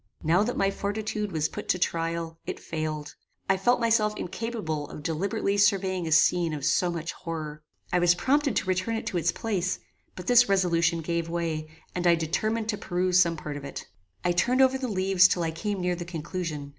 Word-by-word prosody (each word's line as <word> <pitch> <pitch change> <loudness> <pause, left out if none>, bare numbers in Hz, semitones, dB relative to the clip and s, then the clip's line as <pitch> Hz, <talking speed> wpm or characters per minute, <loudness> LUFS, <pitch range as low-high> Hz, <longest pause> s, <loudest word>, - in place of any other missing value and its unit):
Now 170 +4 +3
that 235 +4 -1
my 195 0 +2
fortitude 210 +1 -3
was 160 -2 0
put - - -8
to - - +3
trial, 165 -1 -2
it - - -4
failed. 155 -2 -4 0.3
I 195 - +4
felt 240 +7 +2
myself 220 -2 +2
incapable 175 -8 -4
of 150 - -9
deliberately 190 +5 -1
surveying 190 -3 +2
a - - -3
scene 170 +1 +4
of 140 -2 -4
so 175 +3 +2
much 165 -1 -3
horror. 155 -3 -6 0.3
I 180 - +4
was 175 0 +4
prompted 280 +8 +1
to - - +1
return 185 +5 0
it 225 - -4
to 180 - -2
its 170 +1 +2
place, 190 -5 -1 0.4
but 180 - -8
this 245 +1 +5
resolution 170 -3 +2
gave 170 +1 -2
way, 165 -2 -2 0.2
and 180 0 0
I 170 - +6
determined 215 +8 -1
to 210 - -1
peruse 180 0 +1
some 170 -2 +3
part 150 -1 -5
of 145 - -8
it. 140 - -7 0.4
I 175 - +3
turned 245 +9 +2
over 260 0 +4
the 260 - -2
leaves 190 -3 +4
till 175 - 0
I 165 - -1
came 200 +5 -3
near 180 0 0
the 175 - -5
conclusion. 165 -3 -5
180 Hz, 205 wpm, -27 LUFS, 165-200 Hz, 0.4 s, I